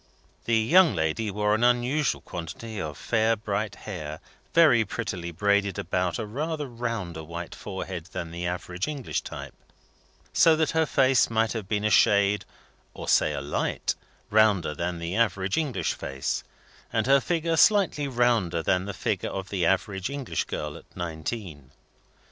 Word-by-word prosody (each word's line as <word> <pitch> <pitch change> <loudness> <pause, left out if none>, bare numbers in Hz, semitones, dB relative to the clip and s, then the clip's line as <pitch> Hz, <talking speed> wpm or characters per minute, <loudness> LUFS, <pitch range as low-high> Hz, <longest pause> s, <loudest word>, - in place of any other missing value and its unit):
The 115 -1 +3
young 165 +10 +5
lady 80 +7 0
wore 105 +1 +1
an 110 +2 +1
unusual 125 +4 +2
quantity 90 +6 -6
of 75 -2 -5
fair 115 0 +2
bright 105 0 -3
hair, 75 0 -5 0.3
very 150 -9 +6
prettily 95 -5 -4
braided 100 +2 +1
about 90 0 -1
a 115 - -3
rather 150 +7 -3
rounder 115 - -4
white 85 +2 -7
forehead 95 -4 -6
than 85 -3 -6
the 85 +1 -3
average 90 +1 -3
English 145 -5 -3
type, - - -8 0.2
and - - -33 0.5
so 160 -1 +6
her 160 0 +1
face 130 -2 +4
might 115 0 +1
have 110 -5 -5
been 105 0 -1
a 105 - +2
shade 100 0 +4 0.5
or - - -7
say - - +4
a - - -3
light 70 +1 -1 0.4
rounder 105 -7 +4
than 85 +3 -3
the 85 +2 -4
average 100 -4 +1
English 150 -6 0
face, 65 0 -3 0.5
and - - +1
her 135 +1 +6
figure 165 0 0
slightly 185 -6 +4
rounder 115 -10 +1
than 90 +1 +1
the 100 - -5
figure - - -1
of 95 0 -5
the 90 -4 +1
average 95 +1 0
English 140 -3 -2
girl 75 +1 -4
at - - -17
nineteen. 80 - -5
105 Hz, 160 wpm, -26 LUFS, 90-120 Hz, 0.5 s, very